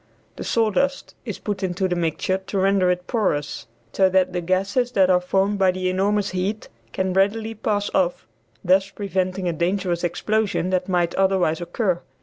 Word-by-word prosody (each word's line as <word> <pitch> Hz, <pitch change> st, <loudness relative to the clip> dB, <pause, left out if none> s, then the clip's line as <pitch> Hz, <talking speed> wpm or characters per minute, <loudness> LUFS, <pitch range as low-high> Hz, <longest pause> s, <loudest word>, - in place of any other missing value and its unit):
The -, -, -5 dB
sawdust 230 Hz, +5 st, 0 dB
is 215 Hz, -5 st, -4 dB
put 205 Hz, -2 st, -4 dB
into 185 Hz, 0 st, -1 dB
the 180 Hz, -, -1 dB
mixture 175 Hz, +3 st, -1 dB
to 190 Hz, +1 st, -5 dB
render 190 Hz, -1 st, +3 dB
it 180 Hz, 0 st, -1 dB
porous 180 Hz, -, -1 dB, 0.3 s
so 190 Hz, -1 st, +4 dB
that 185 Hz, -1 st, +2 dB
the 180 Hz, -, -1 dB
gases 195 Hz, +8 st, 0 dB
that 190 Hz, -3 st, +4 dB
are 180 Hz, 0 st, +4 dB
formed 195 Hz, +3 st, 0 dB
by 190 Hz, -1 st, +4 dB
the 185 Hz, 0 st, 0 dB
enormous 200 Hz, +2 st, 0 dB
heat 190 Hz, +4 st, -3 dB, 0.2 s
can 190 Hz, +4 st, -1 dB
readily 215 Hz, +4 st, +1 dB
pass 205 Hz, -1 st, -1 dB
off, 180 Hz, -2 st, 0 dB, 0.4 s
thus 190 Hz, +2 st, +3 dB
preventing 190 Hz, -2 st, -2 dB
a 170 Hz, -, 0 dB
dangerous 175 Hz, +1 st, -1 dB
explosion 200 Hz, +1 st, 0 dB
that 185 Hz, 0 st, 0 dB
might 175 Hz, -2 st, +1 dB
otherwise 190 Hz, -4 st, +1 dB
occur. 175 Hz, 0 st, -1 dB
190 Hz, 170 wpm, -22 LUFS, 180-200 Hz, 0.4 s, so